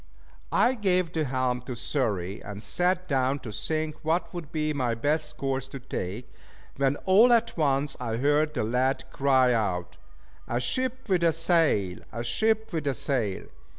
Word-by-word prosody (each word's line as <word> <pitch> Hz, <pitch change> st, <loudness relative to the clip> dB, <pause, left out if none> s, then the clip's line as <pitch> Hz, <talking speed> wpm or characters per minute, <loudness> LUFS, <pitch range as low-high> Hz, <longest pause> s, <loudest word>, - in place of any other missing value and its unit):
I 245 Hz, -, +4 dB
gave 185 Hz, -7 st, +1 dB
the 160 Hz, -2 st, 0 dB
helm 130 Hz, -1 st, -1 dB
to 125 Hz, -, -4 dB
Xury 105 Hz, -, -2 dB
and 100 Hz, +1 st, -7 dB
sat 180 Hz, -, 0 dB
down 135 Hz, -1 st, +1 dB
to 115 Hz, -, -7 dB
think 155 Hz, +8 st, -2 dB
what 165 Hz, +4 st, 0 dB
would 165 Hz, -4 st, -7 dB
be 155 Hz, -2 st, -1 dB
my 125 Hz, -5 st, 0 dB
best 150 Hz, +6 st, -1 dB
course 135 Hz, -1 st, -2 dB
to 135 Hz, -, -7 dB
take: 115 Hz, -3 st, -6 dB, 0.4 s
when 135 Hz, 0 st, +2 dB
all 210 Hz, +6 st, +6 dB
at 230 Hz, -1 st, +3 dB
once 140 Hz, -2 st, +1 dB
I 115 Hz, -2 st, -2 dB
heard 145 Hz, +4 st, +2 dB
the -, -, 0 dB
lad 125 Hz, +4 st, 0 dB
cry 130 Hz, -2 st, +3 dB
out 95 Hz, -6 st, -1 dB, 0.5 s
"A 120 Hz, -, -1 dB
ship 255 Hz, -, -1 dB
with 185 Hz, -4 st, +2 dB
a 165 Hz, -, +5 dB
sail! 160 Hz, -, +2 dB
A 115 Hz, -, -4 dB
ship 220 Hz, -, 0 dB
with 155 Hz, -3 st, -2 dB
a 135 Hz, -, +1 dB
sail!" 115 Hz, -7 st, -1 dB
140 Hz, 170 wpm, -27 LUFS, 120-165 Hz, 0.5 s, all